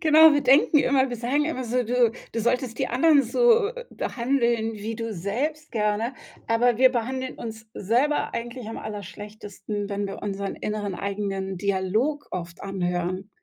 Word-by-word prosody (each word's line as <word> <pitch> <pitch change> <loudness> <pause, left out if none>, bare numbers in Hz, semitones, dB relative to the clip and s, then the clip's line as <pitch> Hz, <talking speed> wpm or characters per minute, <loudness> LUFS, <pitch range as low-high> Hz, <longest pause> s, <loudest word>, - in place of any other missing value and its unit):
genau, 315 -1 +7
wir 290 - +3
denken 275 +3 +5
immer, 270 -1 +3
wir 245 - -3
sagen 255 +6 0
immer 260 -5 -3
so: 245 +2 0
„Du 240 -1 +2 0.2
du 230 - -1
solltest 240 0 0
die - - +1
anderen 285 +3 +4
so, 460 - +4
äh, - - -8
behandeln 235 -3 0
wie 215 +2 -5
du 230 -1 -4
selbst 265 - -3
gerne“ 215 +3 0 0.3
aber 230 +1 +2
wir 260 0 +7
behandeln 260 +2 -3
uns 220 -1 -8
selber 245 +9 +1
eigentlich 240 0 -5
am 225 - -6
allerschlechtesten, 205 -1 -6
wenn 200 0 -2
wir 195 - -7
unseren 200 -1 -3
inneren 210 -2 -3
eigenen 195 -1 -3
Dialog 205 +10 0
oft 170 -2 -6
anhören. 185 0 -2
230 Hz, 160 wpm, -25 LUFS, 205-260 Hz, 0.3 s, genau